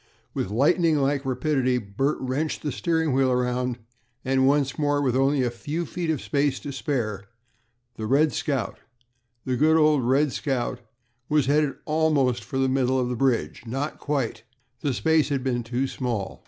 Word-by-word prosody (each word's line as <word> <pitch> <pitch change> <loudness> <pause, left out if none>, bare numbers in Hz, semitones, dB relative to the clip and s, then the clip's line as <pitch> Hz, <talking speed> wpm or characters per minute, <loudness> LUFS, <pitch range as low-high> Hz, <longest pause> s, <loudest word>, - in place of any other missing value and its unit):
With - - -2
lightning 155 - +3
like 140 0 0
rapidity 130 -1 +1
Bert 125 +7 -1
wrenched 135 +4 -2
the 150 - -1
steering 160 -1 0
wheel 130 0 +3
around, 125 0 0 0.5
and 130 0 +3
once 140 -1 +1
more, 145 -1 +2
with 130 -4 +1
only 135 +1 +2
a 120 - 0
few 150 +8 -4
feet 170 +1 -4
of 155 -5 0
space 140 -2 0
to 145 - -5
spare, 115 -8 -2 0.7
the 110 - -4
"Red 145 +4 +3
Scout" 135 -5 -2 0.7
good 150 +5 +3
old 150 -3 +4
"Red 135 +4 +2
Scout," 125 -3 -2 0.5
was 150 -2 +3
headed 145 0 +2
almost 150 -6 +1
for 135 - -5
the 135 0 +2
middle 130 0 +1
of 125 -1 0
the 125 - -2
bridge 125 -2 0
not 135 +6 -3
quite 140 -6 -2 0.4
the 140 - -1
space 160 -1 +2
had 135 -3 -1
been 125 -2 0
too 120 +3 -2
small. 120 -7 -3
135 Hz, 170 wpm, -25 LUFS, 125-150 Hz, 0.7 s, old